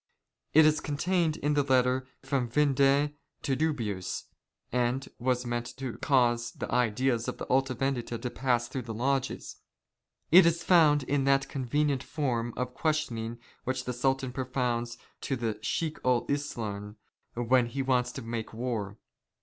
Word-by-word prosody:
It 160 0 +8
is 155 0 +4
contained 160 +2 0
in 145 -1 0
a 145 - +4
letter 130 -1 +2 0.2
from 135 -3 -1
Vindex 140 +1 +3 0.3
to 135 - +1
JViibius, 120 - -2 0.5
and 125 +2 0
was 125 0 0
meant 120 0 -3
to 130 -3 -5
cause 120 -4 +2
the - - -6
ideas 120 0 +1
of - - -3
the - - -5
Alta 130 0 +1
Vendita 120 -2 -2
to 125 - -3
pass 120 -2 0
through 130 +1 -4
the 115 -2 -6
lodges. 135 +3 -1 0.7
It 180 +1 +9
is 170 0 +1
found 155 -5 +5
in 135 +1 0
that 135 0 +3
convenient 140 +1 0
form 120 -6 -2
of 125 0 -2
questioning 120 -8 -1 0.3
which 130 0 -2
the 125 - -2
Sultan 135 +1 0
propounds 125 -2 -2 0.2
to 135 - -1
the 115 -3 -1
Chiek 155 +7 -2
ul 125 -2 +2
Islam 110 -8 -3 0.4
when 120 +1 +3
he 135 +3 -3
wants 125 -2 +1
to 130 - -6
make 115 -1 -5
war. 110 -4 -3
130 Hz, 155 wpm, -29 LUFS, 120-140 Hz, 0.7 s, It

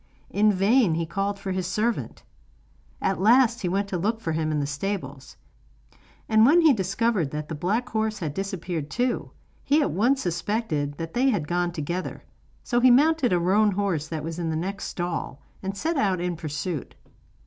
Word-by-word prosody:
In 210 +1 +4
vain 200 -1 +3
he 165 0 -1
called 195 +4 -2
for 195 - -5
his 185 -1 -2
servant. 220 +5 -2 0.8
At 190 -1 0
last 240 +3 +4
he 180 - -1
went 200 +2 0
to 180 - -2
look 220 +5 0
for 170 -8 -3
him 155 0 -1
in 150 - 0
the 145 - 0
stables, 145 -3 -5 0.9
and 220 0 +5
when 310 +9 +6
he 315 -4 +6
discovered 195 - 0
that 150 +1 -5
the - - -3
black 195 +11 -1
horse 220 -1 -1
had 160 -7 -4
disappeared 180 -4 -4
too, 250 0 -1 0.3
he 290 +2 +3
at 290 - +1
once 245 +9 +2
suspected 170 -5 -2
that 165 0 -6
they 260 +2 +3
had 175 - -1
gone 175 +1 0
together; 170 +3 -4 0.4
so 240 - +1
he 255 +1 +6
mounted 285 +1 +4
a 180 - +3
roan 200 +4 +3
horse 185 -6 -1
that 160 -2 -4
was 165 +2 -5
in 165 -2 -2
the 160 - -1
next 190 +5 -3
stall, 175 -5 -4 0.2
and 195 +1 -4
set 325 +5 -1
out 195 -7 +1
in 175 0 -2
pursuit. 155 -1 -5
190 Hz, 190 wpm, -25 LUFS, 165-220 Hz, 0.9 s, when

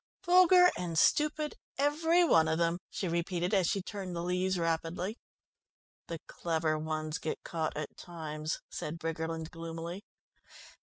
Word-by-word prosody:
"Vulgar 360 0 +7
and 170 -2 -3
stupid, 300 - +2 0.2
every 320 +5 +3
one 160 - +5
of 160 0 +1
them," 170 +1 +1
she 190 - -3
repeated, 175 +2 -1
as 190 -4 +4
she 195 +1 0
turned 190 -3 -5
the 170 - -2
leaves 180 +1 0
rapidly. 165 +5 -1 0.9
"The 165 - -4
clever 160 -2 -1
ones 155 0 -3
get 155 - -4
caught 160 -3 -2
at 150 -1 -5
times," 155 -2 -5
said 150 +2 -4
Briggerland 165 0 -3
gloomily. 165 +3 -6
170 Hz, 140 wpm, -31 LUFS, 160-195 Hz, 0.9 s, Vulgar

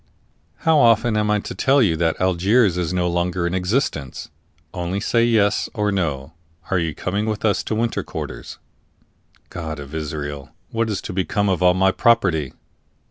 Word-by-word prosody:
"How 160 -2 +5
often 115 -2 +4
am 105 0 +1
I 105 - +3
to - - -6
tell 135 +1 +3
you 100 -10 +3
that 80 0 0
Algiers 95 +3 +3
is 90 -2 -2
no 90 -1 0
longer 85 0 -1
in 85 - -1
existence? 90 - -2 0.4
Only 90 +2 -3
say 115 +2 +1
yes 110 -3 +2
or 105 -2 0
no 80 -6 -2 0.4
are 90 - +2
you 80 -3 -2
coming 100 +4 -2
with 110 0 -2
us 105 - +2
into 110 - -3
winter 115 +1 -1
quarters?" - - -7 0.9
"God 80 -3 -5
of 70 +1 -9
Israel! 75 -3 -5 0.2
what 115 0 -1
is 105 - -3
to - - -6
become 95 +2 0
of 90 -2 0
all 90 0 +5
my 95 +1 +3
property?" 95 - +2
95 Hz, 175 wpm, -21 LUFS, 85-110 Hz, 0.9 s, How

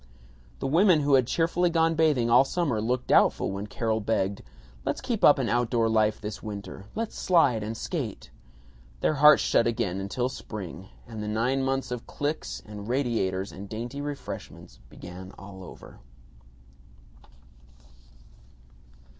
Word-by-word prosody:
The - - -5
women 165 +3 +4
who 145 0 +2
had 130 -3 +5
cheerfully 170 +3 +1
gone 165 -1 +2
bathing 155 -7 +2
all 120 +3 +6
summer 140 -6 -1
looked 125 +3 -1
doubtful - - +3
when 100 +2 -5
Carol 110 0 -1
begged, 100 -2 -1 0.4
"Let's - - -2
keep 240 -5 -3
up 145 - +8
an 130 -3 -1
outdoor 120 -1 +1
life 110 -1 +2
this 105 -1 -6
winter, 100 -2 -7
let's 225 0 -3
slide 140 -11 +3
and 110 +2 -4
skate." - - -5 0.7
Their - - +2
hearts 150 +1 +7
shut 115 - +3
again 95 -4 -2
till 125 +4 0
spring, 95 -7 -8 0.2
and 110 -2 -7
the 105 - -4
nine 120 +5 0
months 135 -1 -1
of 125 -2 -5
cliques 145 +2 -4
and 105 -1 -8
radiators 110 -7 -1
and 95 +2 -9
dainty 120 +6 -5
refreshments 145 - -7
began 90 +5 -10
all 95 -1 -10
over. 90 - -12
120 Hz, 145 wpm, -27 LUFS, 105-145 Hz, 0.7 s, up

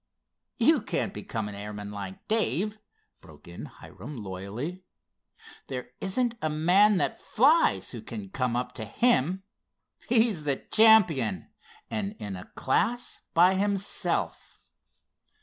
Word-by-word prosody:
"You - - +4
can't - - -2
become 110 -2 -4
an 105 - -7
airman 105 0 -7
like 100 -2 -8
Dave," 215 -1 0 0.4
broke - - -16
in 85 - -8
Hiram, 145 -2 -11
loyally. 105 - -6 0.8
"There 125 -2 -6
isn't 235 +5 0
a 155 - 0
man 185 +7 +4
that - - -1
flies 300 +8 +3
who - - -7
can 205 -3 -7
come 125 -8 -1
up 125 0 -2
to 110 - -5
him. 190 - +1 0.7
He's 225 -8 +3
the 140 -2 +1
champion, 180 - +4 0.4
and 205 -1 -3
in 100 -2 -6
a 90 - -9
class 230 - -1
by 180 +3 +6
himself." 200 0 -2
170 Hz, 125 wpm, -27 LUFS, -, 0.8 s, by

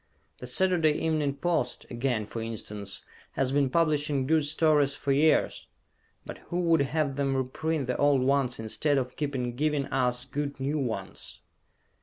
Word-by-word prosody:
The 125 - -7
Saturday 165 +2 +3
Evening 150 -3 0
Post 160 -6 -1
again, 120 -3 -1
for 115 +2 -6
instance 105 -3 -5 0.3
has 130 -1 0
been 140 -1 +2
publishing 150 -3 +1
good 155 +1 +2
stories 150 -2 +2
for 145 -1 -2
years, 150 +3 +2 0.6
but - - -8
who 175 - -1
would 165 -3 +3
have 140 -1 -1
them 135 -1 0
reprint 140 +3 -2
the 125 0 -2
old 145 -3 +3
ones 135 -2 +1
instead 140 +6 +1
of 130 -1 -2
keep 145 -2 -3 0.2
giving 150 0 0
us 125 -2 0
good 140 +2 -4
new 140 +3 -1
ones? 110 -8 -5
140 Hz, 155 wpm, -28 LUFS, 125-155 Hz, 0.6 s, Saturday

